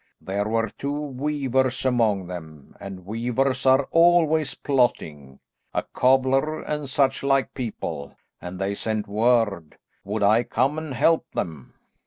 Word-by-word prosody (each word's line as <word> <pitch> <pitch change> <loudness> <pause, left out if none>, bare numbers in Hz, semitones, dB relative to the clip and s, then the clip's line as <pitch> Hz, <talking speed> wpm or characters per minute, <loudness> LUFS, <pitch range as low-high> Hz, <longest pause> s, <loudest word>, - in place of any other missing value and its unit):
There 100 +2 -2
were 115 0 0
two 140 - -2
weavers 135 -2 -1
among 110 -7 +2
them 80 -5 -10
and 95 -2 -9
weavers 125 +5 -1
are 130 +1 +4
always 165 -3 +4
plotting; 75 - -1 0.4
a - - +1
cobbler, 135 +4 +2
and 150 -2 -4
such 135 -1 +1
like 135 -1 +1
people, 110 - -5 0.3
and 90 +1 -7
they 95 +1 -1
sent 110 0 -3
word, 105 -6 +1 0.3
would 105 +2 -2
I 110 +3 +5
come 135 +6 0
and 155 -4 -6
help 165 +7 +2
them. 80 -8 -5
125 Hz, 135 wpm, -24 LUFS, 100-135 Hz, 0.4 s, I